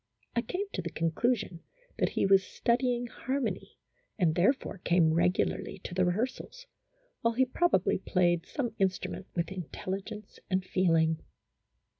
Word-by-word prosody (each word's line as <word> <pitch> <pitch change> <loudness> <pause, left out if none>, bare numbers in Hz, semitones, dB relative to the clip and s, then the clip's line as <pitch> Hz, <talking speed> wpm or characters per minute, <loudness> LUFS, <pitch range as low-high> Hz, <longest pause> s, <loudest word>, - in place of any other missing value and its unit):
I 235 - +3
came 380 +10 -3
to - - -2
the 170 - -4
conclusion 175 +3 0 0.4
that - - +3
he - - +2
was 195 0 +5
studying 245 +4 0
har 260 +3 -3
mony, 215 -8 -4 0.4
and 175 -6 +3
therefore 195 - +1
came 170 -2 +3
regularly 180 +3 +1
to - - -6
the 185 - +1
rehears 205 +9 +1
als, - - -13 0.6
while 230 0 +1
he 260 +2 +4
probably 260 - +2
played 175 -3 +1
some 245 -7 -2
instrument 190 0 -1
with 170 +1 -1
intelligence 190 +3 -6
and 185 -1 0
feeling. 165 -4 +2
190 Hz, 145 wpm, -30 LUFS, 175-240 Hz, 0.6 s, was